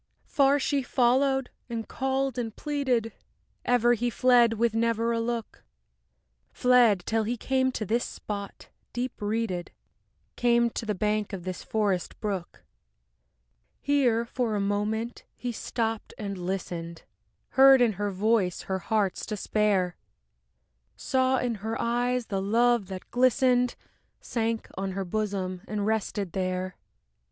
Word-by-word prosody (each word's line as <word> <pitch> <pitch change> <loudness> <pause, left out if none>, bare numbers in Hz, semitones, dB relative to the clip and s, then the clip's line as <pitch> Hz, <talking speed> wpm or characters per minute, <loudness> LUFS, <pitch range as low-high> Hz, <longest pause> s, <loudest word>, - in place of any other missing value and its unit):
IV - - -32
Far 280 0 +4
she 280 0 +1
followed 260 +1 +2 0.2
and 230 -1 -4
called 265 -1 -1
and 225 -2 -4
pleaded, 260 -7 -1 0.5
Ever 240 -1 +4
he 240 +1 0
fled 240 -1 +4
with 230 0 +1
never 230 0 +1
a 230 - 0
look; 230 0 -4 0.9
Fled, 245 -7 +4
till 225 0 +1
he 240 +3 -2
came 260 +2 +1
to 215 - -3
this 230 +5 +1
spot, 200 -1 -7 0.2
deep 245 0 -4
reeded, 205 -4 -2 0.7
Came 235 -1 +3
to 225 - -5
the 210 - 0
bank 210 +1 -1
of 185 -3 -5
this 185 0 -5
forest 200 -5 -1
brook. 195 -5 -4 1.2
Here 250 -5 +2
for 235 -2 -1
a - - 0
moment 210 +4 -1
he 245 - -4
stopped 225 -1 -3
and 200 -2 -4
listened, 175 -2 -4 0.5
Heard 270 0 +7
in 240 -3 +4
her 205 +2 -2
voice 200 -1 +1
her 190 0 -2
heart's 200 0 0
despair, 205 -4 0 1.0
Saw 260 -1 +1
in 245 -1 0
her 225 +2 -3
eyes 245 +1 0
the 195 -3 -2
love 230 +1 +2
that 190 -1 -8
glistened, 250 0 +3 0.4
Sank 225 -1 -2
on 190 0 -3
her 195 0 -3
bosom 190 -2 -2
and 205 -1 -2
rested 210 -3 -1
there. 185 0 -2
225 Hz, 135 wpm, -27 LUFS, 200-245 Hz, 1.2 s, Heard